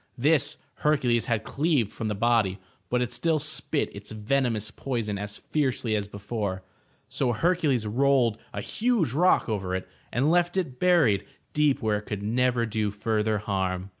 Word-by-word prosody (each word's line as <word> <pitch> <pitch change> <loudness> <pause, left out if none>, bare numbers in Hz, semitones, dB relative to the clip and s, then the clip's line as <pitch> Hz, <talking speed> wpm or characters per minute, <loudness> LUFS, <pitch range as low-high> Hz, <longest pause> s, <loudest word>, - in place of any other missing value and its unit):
This 145 +4 +2 0.2
Hercules 125 -6 +2
had 115 -3 0
cleaved 140 -7 +1
'from 110 - -4
the 105 - -1
body, 110 -3 +2 0.3
but 125 0 +2
it 120 0 -5
still 165 +2 +1
spit 150 -2 -1
its 100 +1 -8
venomous 110 -1 0
poison 115 -6 -3
as 105 0 -4
fiercely 130 -6 -1
as 105 -1 -1
before. 100 -2 -4 0.4
So 130 -2 0
Hercules 150 -4 +1
rolled 120 -1 +2
a 100 - -4
huge 215 - 0
rock 180 +6 +3
over 95 -5 -2
it, 95 - -4 0.2
and 135 +6 +2
left 175 +1 +2
it 135 -9 -2
buried 160 - +4 0.3
deep 150 -4 +2
where 105 -1 +1
it 105 - -15
could 100 -1 -4
never 120 +2 +1
do 110 -1 -1
further 105 +1 0
harm. 95 -3 -2
115 Hz, 165 wpm, -26 LUFS, 105-140 Hz, 0.4 s, buried